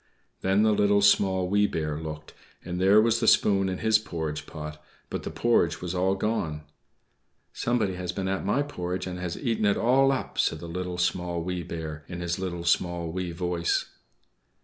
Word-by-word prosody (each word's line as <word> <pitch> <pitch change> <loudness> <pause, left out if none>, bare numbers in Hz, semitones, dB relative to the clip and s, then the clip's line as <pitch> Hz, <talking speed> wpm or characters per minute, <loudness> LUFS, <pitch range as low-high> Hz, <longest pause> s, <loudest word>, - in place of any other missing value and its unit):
Then 95 +3 +3
the 110 - +4
Little, 100 -1 +3
Small, 95 -2 +4
Wee 105 +2 +3
Bear 75 -4 -2
looked, 75 -1 -7 0.3
and 90 +1 -3
there 100 +3 +6
was 115 +1 +3
the 115 - 0
spoon 95 -3 +4
in 90 - -2
his 110 +1 +3
porridge 80 -7 -5
pot; 75 0 -8 0.3
but - - -3
the - - -5
porridge 85 -9 +2
was 90 -1 -4
all 95 +1 +1
gone. 95 -8 -2 0.9
"=Somebody 115 -6 0
has 90 -1 -4
been 95 +1 -3
at 95 0 -1
my 115 +9 +1
porridge 90 -10 -4
and 90 -1 -5
has 90 -2 -4
eaten 115 -5 -1
it 100 - +3
all 135 +3 +4
up!=" 135 - -3
said 80 - +2
the 85 - -8
Little, 90 +1 -4
Small, 90 -1 -1
Wee 90 0 -3
Bear, 80 -3 -6
in 90 -1 -6
his 85 +1 -2
little, 90 -2 -4
small, 85 -1 0
wee 90 0 -3
voice. 85 0 -1
90 Hz, 190 wpm, -27 LUFS, 85-100 Hz, 0.9 s, there